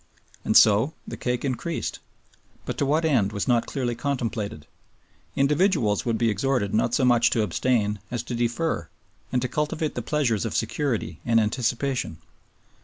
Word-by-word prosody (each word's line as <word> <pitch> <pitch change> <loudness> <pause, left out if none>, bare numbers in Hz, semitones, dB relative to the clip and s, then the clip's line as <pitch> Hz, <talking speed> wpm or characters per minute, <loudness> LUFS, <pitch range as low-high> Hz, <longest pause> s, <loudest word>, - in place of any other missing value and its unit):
And - - +4
so 110 +8 +5
the - - -5
cake 125 +2 -2
increased; 140 +6 -3 0.7
but - - -3
to 140 - +1
what 155 +3 +2
end 120 -11 +2
was 100 -1 -3
not 120 -2 +2
clearly 125 -3 -2
contemplated. 115 - -3 0.7
Individuals 140 - +2
would 115 -2 0
be 115 0 +2
exhorted 105 -1 0
not 115 +2 +2
so 130 - +2
much 120 -2 +4
to 110 - +1
abstain 105 +1 0
as 120 -2 -3
to 120 - -6
defer, 120 - -1 0.4
and 125 0 0
to - - 0
cultivate 150 +3 -2
the 120 - -3
pleasures 120 -5 0
of 115 - -3
security 120 +1 -1
and 115 -1 +3
anticipation. 120 - -1
120 Hz, 160 wpm, -25 LUFS, 110-140 Hz, 0.7 s, so